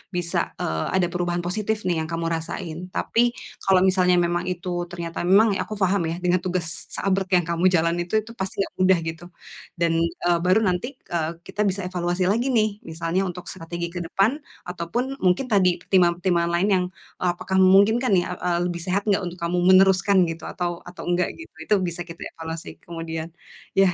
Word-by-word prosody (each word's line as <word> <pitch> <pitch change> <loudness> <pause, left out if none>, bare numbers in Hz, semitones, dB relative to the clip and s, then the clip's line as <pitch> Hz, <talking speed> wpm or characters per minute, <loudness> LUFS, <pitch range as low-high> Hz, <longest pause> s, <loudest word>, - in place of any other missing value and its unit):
bisa 175 -1 -1
eee, 80 0 -1
ada 180 -2 +3
perubahan 175 0 -1
positif, 215 +4 -1
nih, 175 - +2
yang 160 - -5
kamu 165 0 -2
rasain. 165 0 -5 0.2
Tapi 240 +1 +2 0.3
kalau 190 -1 +4
misalnya 185 -1 +4
memang 175 0 +1
itu 180 0 -5 0.2
ternyata 170 -1 -4
memang 200 +3 +5
aku 215 - -7
paham, 190 +1 +3
ya, - - -2
dengan 180 +1 +3
tugas 180 -2 -3
seabrek 195 -1 -1
yang 175 - -3
kamu 170 +1 0
jalan 170 0 +2
itu, 175 - -13
itu 225 +2 -12
pasti 190 +1 -4
nggak - - -3
mudah 185 -1 +5
gitu. 165 +1 -6 0.5
Dan, 170 -1 +2
eee, 170 +1 0
baru 185 +4 +4
nanti, 180 +5 0
eee, 165 -2 -2 0.2
kita 210 - -3
bisa 200 -1 0
evaluasi 180 0 -1
lagi, 240 +5 +1
nih, 220 -3 +3
misalnya 165 +3 -2
untuk 180 -1 -6
strategi 170 -1 -5
ke - - -2
depan, 215 - +1 0.2
ataupun 185 +10 -3
mungkin 185 +8 +2
tadi 185 -6 +3
pertimbangan-pertimbangan 175 -1 +2
lain 175 +4 +2
yang, 180 -1 +1 0.4
eee, 180 - +3
apakah 190 +2 -4
memungkinkan, 200 +6 +5
nih, 180 -2 +4
eee, 180 -1 -1
lebih 170 -1 -4
sehat 195 +3 -1
enggak 195 -2 +2
untuk 175 0 -6
kamu 170 +1 -1
meneruskan 190 0 +5
gitu, 165 -1 -6
atau 175 -1 -3
atau 175 0 -9
enggak 175 +1 +1
gitu. 330 - -11
Itu 210 - +1
bisa 175 -1 -3
kita 165 -1 -11 0.2
evaluasi 160 0 -7
kemudian, 165 -1 -5 0.5
yah 190 -2 +5
180 Hz, 185 wpm, -24 LUFS, 170-190 Hz, 0.5 s, memang